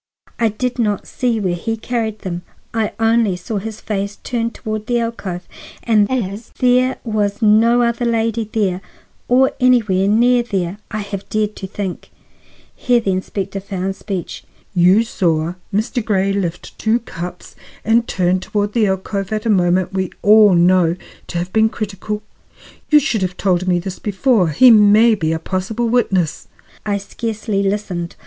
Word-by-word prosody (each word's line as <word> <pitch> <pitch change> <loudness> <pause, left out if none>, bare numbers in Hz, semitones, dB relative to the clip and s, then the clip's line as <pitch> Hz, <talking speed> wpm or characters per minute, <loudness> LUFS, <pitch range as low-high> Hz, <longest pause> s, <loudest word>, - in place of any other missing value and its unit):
I 230 -1 +3
did 250 +4 -3
not 210 -4 0
see 240 -3 -1
where 185 -4 0
he 225 +6 -3
carried 220 -2 -3
them; 175 -3 -4 0.3
I 225 -2 -1
only 225 -3 +2
saw 200 +4 -4
his 215 +2 -7
face 200 -1 -3
turned 230 -1 -2
toward 215 -1 -5
the 240 -1 +1
alcove; 200 -6 -4 0.4
and 210 -3 +3
as 215 -3 -3
there 255 +1 +3
was 210 -2 -1
no 230 +3 +5
other 235 +1 0
lady 225 -1 0
there, 195 -4 0 0.5
or 260 +2 +4
anywhere 220 -7 +3
near 240 +4 +4
there, 195 -4 -3
I 215 -1 -3
have 200 -1 -7
dared 215 -1 -1
to 190 - -6
think—" 190 -2 -5 0.7
Here 245 -1 +2
the 200 -4 -1
inspector 190 +1 -3
found 190 0 -4
speech. 195 -3 -5 0.3
"You 185 +4 +5
saw 170 -6 0 0.2
Mr. 220 +4 -1
Grey 195 -2 +1
lift 175 -4 -4
two 220 +1 +2
cups 180 -4 -8 0.3
and 230 +1 +3
turn 185 0 +1
toward 205 +2 -2
the 225 -3 +2
alcove 195 +1 -2
at 215 0 -2
a 225 - +3
moment 180 -1 +2
we 190 -1 -1
all 210 -2 +7
know 175 -1 +4 0.3
to - - -4
have 175 +2 -4
been 220 0 +4
critical? 210 0 -5 0.7
You 300 - +7
should 265 -8 +1
have 180 -1 -2
told 185 -2 0
me 180 -1 +3
this 180 +1 -5
before. 210 -3 +1
He 240 - +6
may 215 +1 +6
be 160 -7 -1
a 160 - 0
possible 195 +7 -2
witness." 195 -9 0 0.4
I 205 -1 +1
scarcely 215 0 -3
listened. 195 -4 -2
210 Hz, 165 wpm, -18 LUFS, 185-230 Hz, 0.7 s, all